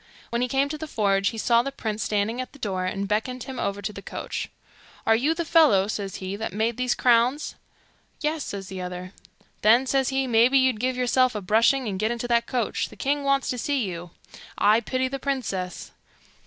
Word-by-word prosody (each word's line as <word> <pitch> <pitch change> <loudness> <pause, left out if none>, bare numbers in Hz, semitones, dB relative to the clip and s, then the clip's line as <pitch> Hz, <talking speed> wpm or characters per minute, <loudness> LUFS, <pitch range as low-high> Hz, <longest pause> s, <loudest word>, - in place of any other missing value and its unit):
When 235 +1 0
he 250 - +1
came 270 +3 +1
to 305 +1 -5
the 315 - -5
forge 200 -6 +1
he 225 - -7
saw 235 +1 +3
the 275 +3 -4
prince 220 -5 -4
standing 215 +4 0
at 255 - -8
the - - -13
door, 190 -7 -2
and 195 +1 -2
beckoned 230 +4 -1
him 265 -1 -7
over 200 0 -2
to 210 - -3
the 200 - -8
coach. - - -5 0.6
'Are 225 - +5
you 290 +8 +1
the 340 0 -2
fellow,' 300 - +5
says 200 -3 -4
he, 190 +1 -4
'that 215 -2 -4
made 220 +3 0
these 255 -1 +1
crowns?' 245 +4 +2 0.7
'Yes,' 305 0 -1
says 195 -1 -6
the 190 -1 -6
other. 180 +1 -6 0.5
'Then,' 235 +5 +5
says 265 -1 +1
he, 270 0 0
'maybe 240 +2 +4
you'd 260 -4 +3
give 255 +2 -1
yourself 255 -1 +2
a - - -1
brushing, 230 +6 +3
and 190 -2 -3
get 215 +2 +1
into 240 0 -3
that 235 -1 +2
coach; 245 -4 -1
the - - -13
king 285 +1 -1
wants 275 -1 +1
to 250 - -3
see 275 +1 0
you. 175 -3 -5 0.5
I 215 +2 +5
pity 255 +3 -1
the 275 +1 -5
princess. 235 -10 -3
235 Hz, 215 wpm, -25 LUFS, 205-265 Hz, 0.7 s, Are